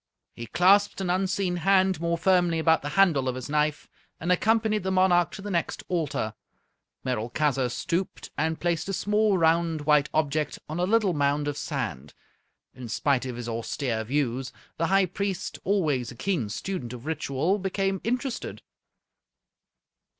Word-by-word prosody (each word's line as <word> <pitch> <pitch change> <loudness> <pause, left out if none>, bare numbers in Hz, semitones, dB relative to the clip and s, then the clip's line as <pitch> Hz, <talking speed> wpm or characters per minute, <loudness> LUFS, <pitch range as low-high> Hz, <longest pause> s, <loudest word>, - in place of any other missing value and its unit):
He 115 - -8
clasped 195 - +4
an 185 -2 -1
unseen 185 -1 0
hand 190 0 +3
more 170 0 0
firmly 175 -1 +3
about 160 0 +3
the 145 - -4
handle 160 -9 +4
of 125 - -3
his 130 -1 -6
knife, 150 0 0 0.3
and 175 +3 -1
accompanied 220 +2 +2
the 190 - -2
monarch 185 -2 +3
to 195 - -8
the 205 - -4
next 170 -2 -2
altar. 150 - -1 0.7
Merolchazzar 125 +2 0
stooped, 170 +9 -3
and 160 +1 -1
placed 170 +1 -1
a - - -1
small 210 +1 +2
round 165 -1 +2
white 150 -1 +3
object 155 -1 0
on 155 +3 -4
a 180 - +2
little 215 -3 +3
mound 145 0 +1
of 145 - -2
sand. 70 - -4 0.6
In 125 -2 -9
spite 130 +2 +1
of 125 - -5
his 120 -1 -6
austere 115 0 -2
views, 130 0 -1 0.3
the 165 - +1
High 195 +1 +4
Priest, 190 +1 -4
always 155 - +1
a - - -9
keen 135 - -1
student 125 - -4
of 125 +1 -9
ritual, 160 +4 0
became 195 0 -1
interested. 250 +2 -3
165 Hz, 155 wpm, -26 LUFS, 140-190 Hz, 0.7 s, clasped